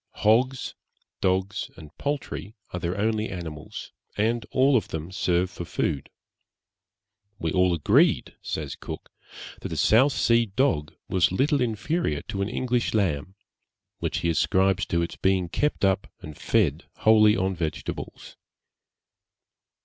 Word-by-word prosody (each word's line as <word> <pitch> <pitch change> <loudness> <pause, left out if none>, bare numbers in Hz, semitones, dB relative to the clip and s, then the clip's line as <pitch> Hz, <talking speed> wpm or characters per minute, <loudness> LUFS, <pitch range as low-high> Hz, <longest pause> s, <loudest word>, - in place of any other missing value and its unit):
Hogs, 125 +5 +2 0.5
dogs, 95 +2 0
and 80 -2 -12
poultry 140 -6 -3 0.2
are 90 - -2
their 85 +2 -2
only 110 +1 0
animals, 80 -5 -7 0.3
and 115 +3 0
all 135 +1 +4
of 115 - +2
them 80 +3 -5
serve 90 -2 +1
for - - -6
food. 75 -4 -2 1.3
'We 80 -5 -2
all 90 0 +3
agreed,' 80 - +3
says - - -4
Cook, - - -8 0.5
'that - - -5
a - - -4
South 130 +6 +5
Sea 115 0 +3
dog 100 - 0
was 90 -2 +2
little 140 +8 +2
inferior 115 - -1
to 100 - -2
an 100 - -1
English 125 -1 0
lamb,' 90 -3 0 0.6
which - - -2
he 85 - +1
ascribes 95 +3 +2
to 85 0 +1
its 85 - -5
being 95 -2 +1
kept 150 - 0
up 95 0 +1
and 75 -1 -9
fed 85 -7 +1 0.2
wholly 110 -1 +6
on 95 +1 0
vegetables. 80 -3 -5
95 Hz, 135 wpm, -26 LUFS, 85-115 Hz, 1.3 s, wholly